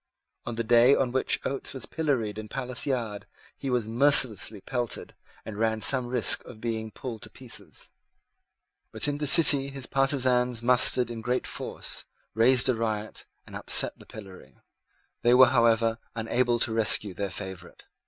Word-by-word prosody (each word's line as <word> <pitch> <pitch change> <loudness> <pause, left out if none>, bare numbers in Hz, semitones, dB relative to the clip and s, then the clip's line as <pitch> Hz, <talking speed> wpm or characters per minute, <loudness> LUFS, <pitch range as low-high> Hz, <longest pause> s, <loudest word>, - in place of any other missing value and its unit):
On 120 - -4
the 115 - -2
day 120 +4 +5
on 125 -2 0
which 130 +1 0
Oates 135 0 -4
was 130 - -5
pilloried 125 -10 -2
in 110 - -8
Palace 125 +3 -3
Yard 110 -6 -3 0.3
he 135 - -6
was 120 -4 -1
mercilessly 115 -4 +2
pelted 120 +3 -4 0.3
and 105 -1 -8
ran 110 -1 0
some 125 +2 +2
risk 125 -1 +2
of 120 -4 -12
being 110 -1 -4
pulled 115 0 -8
in - - -21
pieces. 125 -3 -9 1.0
But 110 +5 -1
in 145 0 -2
the 150 - -2
City 140 -3 +5
his 135 -2 -6
partisans 125 -3 +1
mustered 125 -1 +3
in 115 -1 -6
great 125 +2 -2
force, - - -5 0.3
raised 125 +3 +4
a 130 - +3
riot, 110 -2 -4 0.2
and - - -12
upset - - +1
the - - -16
pillory. 95 - -13 0.6
They 120 +1 +4
were, 130 -1 +7
however, 115 -1 +2 0.2
unable 120 +2 0
to 115 -1 -1
rescue 110 -3 +3
their 100 +2 -4
favourite. 95 -2 -9
120 Hz, 165 wpm, -26 LUFS, 110-130 Hz, 1.0 s, were